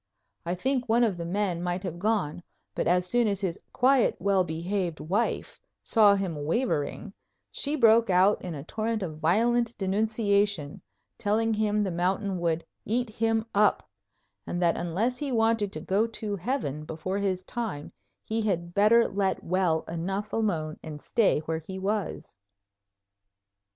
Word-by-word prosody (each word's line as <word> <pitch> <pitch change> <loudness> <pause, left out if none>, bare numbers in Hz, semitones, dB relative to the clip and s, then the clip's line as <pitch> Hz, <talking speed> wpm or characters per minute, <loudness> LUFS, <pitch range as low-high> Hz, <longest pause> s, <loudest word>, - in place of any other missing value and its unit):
I 175 - 0
think 255 +4 -1
one 235 +2 +4
of 215 -5 +2
the 170 -1 -4
men 185 -2 -1
might 180 +1 -2
have 175 -2 -5
gone, 195 -6 0 0.3
but - - -1
as 180 +1 +3
soon 235 +5 +2
as 200 -2 0
his 180 -4 -2
quiet, 260 0 +3
well 195 -2 +2
behaved 175 +1 -3
wife 195 +9 -2 0.2
saw 210 -3 +5
him 175 -7 -3
wavering 195 - -1 0.4
she 290 +2 -2
broke 230 -4 +5
out 190 +3 +4
in 175 -3 -5
a 140 - -6
torrent 220 +4 -2
of 155 -4 -6
violent 230 +8 +2
denunciation, 200 -5 0 0.4
telling 225 +1 +1
him 210 -1 +1
the 190 - -1
mountain 185 +2 -1
would 165 -1 -1 0.2
"eat 240 +1 -1
him 225 0 0
up" 210 +1 +3 0.6
and 175 - -2
that 170 -2 +3
unless 200 +9 -1
he 285 -2 -3
wanted 225 -3 +2
to - - -5
go 205 +4 +1
to 215 -2 -4
heaven 180 - -3
before 165 +6 -4
his 190 -2 -1
time 215 -12 -5 0.3
he 225 +1 -2
had 175 -5 -1
better 215 +4 +5
let 195 -1 -1
well 175 -3 +1
enough 190 +5 -3
alone 165 -9 -1
and 155 -2 -8
stay 215 -9 +2
where 160 +1 -3
he 190 - -5
was. 200 +2 -3
200 Hz, 155 wpm, -27 LUFS, 175-225 Hz, 0.6 s, saw